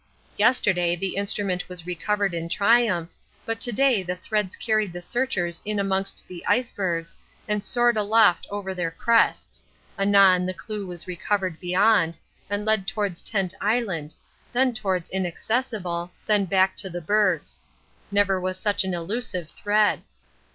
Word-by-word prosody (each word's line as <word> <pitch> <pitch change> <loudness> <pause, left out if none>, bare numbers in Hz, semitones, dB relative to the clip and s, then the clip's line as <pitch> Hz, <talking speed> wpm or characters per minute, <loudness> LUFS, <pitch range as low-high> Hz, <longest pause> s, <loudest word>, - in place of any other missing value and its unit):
Yesterday 190 -6 +2
the 190 +2 -3
instrument 200 -2 -1
was 180 -2 -5
recovered 195 +2 -1
in 165 0 -4
triumph, 200 -5 +2 0.3
but 225 0 -3
to 245 - +2
day 255 -2 +3
the 180 0 -3
threads 210 +1 -2
carried 215 -4 0
the 175 - -5
searchers 175 -4 -2
in 210 0 -2
amongst 195 0 -1
the 180 -2 -9
icebergs 180 -9 -1 0.3
and 210 -1 -2
soared 240 -1 +3
aloft 210 -2 +3
over 200 -2 -4
their 175 -3 -2
crests 230 +8 +1 0.4
anon 195 -2 +5
the 185 - -3
clue 210 -1 -6
was 175 -2 -6
recovered 185 -1 -2
beyond, 180 -2 +2 0.3
and 205 +1 -2
led 215 -3 +1
towards 205 -6 -2
Tent 195 -4 -1
Island, 195 -9 -1 0.4
then 255 +1 +2
towards 190 -6 -2
Inaccessible, 190 -1 -2 0.2
then 210 -2 +3
back 190 +1 +2
to 190 - -1
the 175 0 -5
bergs. 205 +5 0 0.5
Never 200 -2 +2
was 185 0 -2
such 205 +1 +1
an 190 -1 -2
elusive 180 -1 -3
thread. 210 0 +1
195 Hz, 145 wpm, -24 LUFS, 180-215 Hz, 0.5 s, anon